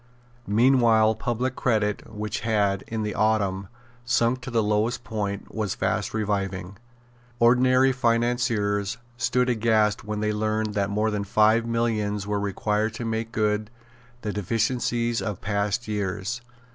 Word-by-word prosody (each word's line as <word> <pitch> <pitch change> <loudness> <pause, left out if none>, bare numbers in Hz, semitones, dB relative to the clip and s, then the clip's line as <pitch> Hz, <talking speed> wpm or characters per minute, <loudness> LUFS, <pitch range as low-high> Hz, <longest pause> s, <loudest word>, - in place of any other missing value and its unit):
Meanwhile 115 0 +4
public 120 +3 -2
credit, 105 -4 0
which 105 +1 -4
had, 100 -4 +1
in 110 -1 -3
the 105 - -2
autumn, 100 -3 +1 0.4
sunk 120 +1 +1
to 130 - -6
the 115 -3 +1
lowest 105 +3 0
point, 100 -3 -4
was 105 -3 -2
fast - - -1
reviving. 100 -3 -2 0.6
Ordinary 130 +2 +5
financiers 115 -4 0 0.2
stood 125 +2 +1
aghast 110 -3 +2
when 105 0 -4
they 105 0 0
learned 110 0 -1
that 100 -1 0
more 105 +2 0
than 105 -1 -1
five 110 +3 +3
millions 110 -3 -1
were 105 0 -1
required 105 +2 -1
to 120 - -5
make 115 0 -2
good 105 -1 0 0.5
the 105 -2 -2
deficiencies 115 +3 0
of 105 -4 -3
past 100 +2 -1
years. 105 +2 -3
110 Hz, 135 wpm, -25 LUFS, 105-115 Hz, 0.6 s, Ordinary